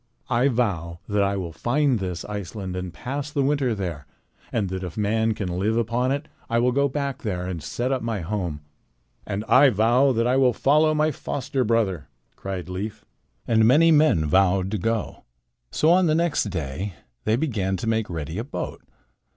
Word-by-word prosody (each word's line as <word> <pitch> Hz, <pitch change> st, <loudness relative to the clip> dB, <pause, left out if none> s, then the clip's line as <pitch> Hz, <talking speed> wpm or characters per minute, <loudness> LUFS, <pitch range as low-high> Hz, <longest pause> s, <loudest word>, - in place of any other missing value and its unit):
"I 120 Hz, +3 st, +3 dB
vow 95 Hz, -, -1 dB
that 105 Hz, -1 st, +1 dB
I 100 Hz, 0 st, +1 dB
will 90 Hz, -3 st, -4 dB
find 125 Hz, -, +1 dB
this 90 Hz, -3 st, -4 dB
Iceland 100 Hz, -2 st, -5 dB
and 90 Hz, -1 st, -4 dB
pass 135 Hz, -, -5 dB
the 145 Hz, -2 st, 0 dB
winter 135 Hz, -4 st, +1 dB
there, 85 Hz, -8 st, -5 dB, 0.4 s
and 105 Hz, -4 st, 0 dB
that 95 Hz, 0 st, -4 dB
if 90 Hz, +1 st, -7 dB
man 110 Hz, +1 st, +1 dB
can 90 Hz, -4 st, -3 dB
live 110 Hz, +4 st, +1 dB
upon 120 Hz, +3 st, 0 dB
it 140 Hz, +1 st, -2 dB, 0.2 s
I 115 Hz, -, +1 dB
will 125 Hz, +2 st, +3 dB
go 140 Hz, +2 st, +2 dB
back 140 Hz, 0 st, -3 dB
there 90 Hz, -5 st, -3 dB
and 90 Hz, -3 st, -4 dB
set 120 Hz, -, -2 dB
up 130 Hz, -, 0 dB
my 115 Hz, -4 st, -2 dB
home." 85 Hz, -4 st, -3 dB, 0.7 s
"And 105 Hz, +1 st, -3 dB
I 135 Hz, +4 st, +6 dB
vow 120 Hz, +5 st, +3 dB
that 115 Hz, 0 st, +1 dB
I 125 Hz, +2 st, +2 dB
will 130 Hz, -2 st, +4 dB
follow 155 Hz, +5 st, +3 dB
my 155 Hz, +1 st, +2 dB
foster 135 Hz, -1 st, -2 dB
brother," 105 Hz, -, 0 dB, 0.3 s
cried 95 Hz, -2 st, -5 dB
Leif. 105 Hz, +4 st, -5 dB, 0.4 s
And 110 Hz, -1 st, +4 dB
many 160 Hz, +7 st, +6 dB
men 150 Hz, -, +4 dB
vowed 95 Hz, +3 st, +2 dB
to 105 Hz, -, -1 dB
go. 115 Hz, +2 st, -2 dB, 0.5 s
So 155 Hz, -, +2 dB
on 180 Hz, 0 st, +4 dB
the 155 Hz, -, +3 dB
next 170 Hz, -5 st, +1 dB
day 90 Hz, 0 st, -4 dB, 0.3 s
they 110 Hz, -, +3 dB
began 105 Hz, -9 st, -1 dB
to 115 Hz, -, -5 dB
make 110 Hz, -1 st, 0 dB
ready 80 Hz, +2 st, -4 dB
a -, -, -2 dB
boat. 135 Hz, -, -5 dB
110 Hz, 190 wpm, -24 LUFS, 95-130 Hz, 0.7 s, I